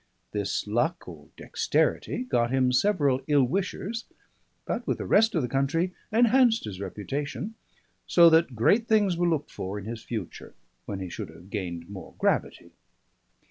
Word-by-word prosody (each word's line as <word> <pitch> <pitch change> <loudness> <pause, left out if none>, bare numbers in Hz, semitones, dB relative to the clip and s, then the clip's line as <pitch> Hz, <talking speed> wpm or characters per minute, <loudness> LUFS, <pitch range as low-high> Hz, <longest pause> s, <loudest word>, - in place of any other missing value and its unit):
This 100 -2 -2
luck 150 +12 -1
or 80 -5 -11
dexterity - - 0
got 120 -2 +1
him 130 0 +2
several 140 -4 +2
ill 145 -3 +4
wishers, 195 - -2 0.6
but - - -3
with - - 0
the - - -5
rest 225 0 +4
of 160 - +1
the - - -1
country 145 +8 0 0.2
enhanced 235 +1 +4
his 100 -3 -6
reputation; 145 - -4 0.5
so 170 -1 +7
that 160 -5 +3
great 205 - +3
things 205 -5 +3
were 175 0 +1
looked 155 -3 -1
for 95 +2 -5
in 100 - -7
his 115 0 -6
future, 110 -7 -7 0.3
when 95 -1 -4
he 95 - -5
should - - -6
have 90 +4 -15
gained 85 -5 -4
more 100 -1 -10
gravity. - - -1
135 Hz, 160 wpm, -27 LUFS, -, 0.6 s, so